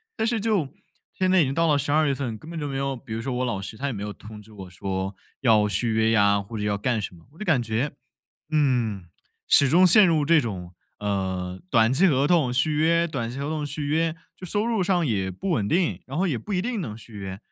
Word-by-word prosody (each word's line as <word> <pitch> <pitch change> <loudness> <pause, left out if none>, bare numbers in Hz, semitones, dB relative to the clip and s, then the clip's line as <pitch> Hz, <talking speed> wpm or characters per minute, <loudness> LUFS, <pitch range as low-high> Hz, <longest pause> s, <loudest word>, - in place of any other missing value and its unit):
但 220 - -1
是 230 0 0
就 200 -9 0 0.4
现 185 0 0
在 185 -1 +5
已 - - +5
经 135 -1 -1
到 165 +3 +2
了 150 -2 +3
12 150 +2 +2
月 140 - +1
份， 120 -5 -4
根 155 - -13
本 170 - -6
就 150 - -3
没 135 - -3
有 135 0 -1
比 110 -2 -9
如 115 - -3
说 130 +1 -3
我 125 +1 -1
老 105 -5 -2
师， 95 - -7
他 140 +5 -3
也 - - -1
没 100 -5 -6
有 105 0 -4
通 105 0 -11
知 110 +1 -17
我 95 -3 -10
说 95 +1 -4 0.3
要 110 -5 +4
续 105 +4 +1
约 110 0 +2
呀， 100 -2 +4
或 100 +3 -8
者 105 - -3
要 105 -1 0
干 115 +1 -1
什 95 - -5
么。 85 -1 -17
我 - - -20
就 215 - -5
感 160 -11 +2
觉， 115 +6 -1 0.6
嗯， 125 - +1 0.4
始 140 - +5
终 180 +6 +6
陷 195 +3 +7
入 160 -4 +2
这 165 +1 +5
种， 95 -8 -5 0.3
呃， 95 -2 -3
短 115 +1 +4
期 185 +8 +4
合 140 -2 +2
同 150 -7 +2
续 130 +5 +1
约， 165 +3 +2
短 130 -8 -4
期 125 - -7
合 140 +1 -3
同 155 -1 -2
续 145 +1 -4
约， 160 +2 0 0.2
就 185 - -10
收 205 +4 0
入 225 -4 +1
上 175 -2 +1
也 95 -6 -1
不 95 - -4
稳 105 - 0
定， 175 - +1
然 135 - -6
后 190 +4 +1
也 140 -10 -1
不 200 - -5
一 180 - 0
定 235 -3 -2
能 110 -10 -5
续 115 0 -14
约， 95 -1 -6
130 Hz, 275 characters per minute, -25 LUFS, 105-160 Hz, 0.6 s, 陷